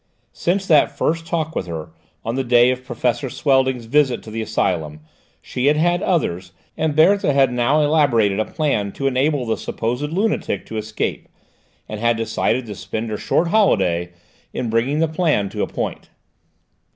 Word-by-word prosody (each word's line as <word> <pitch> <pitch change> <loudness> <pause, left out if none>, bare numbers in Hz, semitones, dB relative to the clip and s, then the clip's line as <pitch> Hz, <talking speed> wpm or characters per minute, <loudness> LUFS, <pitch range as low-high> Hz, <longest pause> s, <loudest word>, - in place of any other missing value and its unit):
Since 190 +3 -1
that 155 -5 +3
first 165 +1 -1
talk 160 -1 -2
with 90 - -2
her, 80 -1 -6 0.3
on 115 - -1
the 135 +1 -1
day 120 0 +5
of 130 0 -4
Professor 125 +1 -2
Swelding's 130 -3 +1
visit 135 +1 +2
to 110 - -10
the 115 +1 -3
asylum, 80 -8 -2 0.4
she 125 +2 -2
had 150 +1 +4
had 175 +3 +2
others, 90 - -1 0.2
and 155 -2 -1
Berthe 195 +6 +5
had 135 -3 +2
now 130 +5 +2
elaborated 125 -10 +2
a 110 - +1
plan 140 -11 -1
to 135 - -5
enable 135 +1 +1
the 115 - -1
supposed 125 +6 -3
lunatic 190 - -1
to 110 - -6
escape, 110 0 -3 0.6
and 110 - -6
had 115 0 +2
decided 115 +2 -1
to 105 - -6
spend 110 +3 -5
her 105 - -2
short 170 +9 0
holiday 95 - +2 0.4
in 120 -3 -3
bringing 130 +7 +1
the 165 - +3
plan 155 - 0
to - - -4
a - - 0
point. - - -5
125 Hz, 175 wpm, -20 LUFS, 110-155 Hz, 0.6 s, day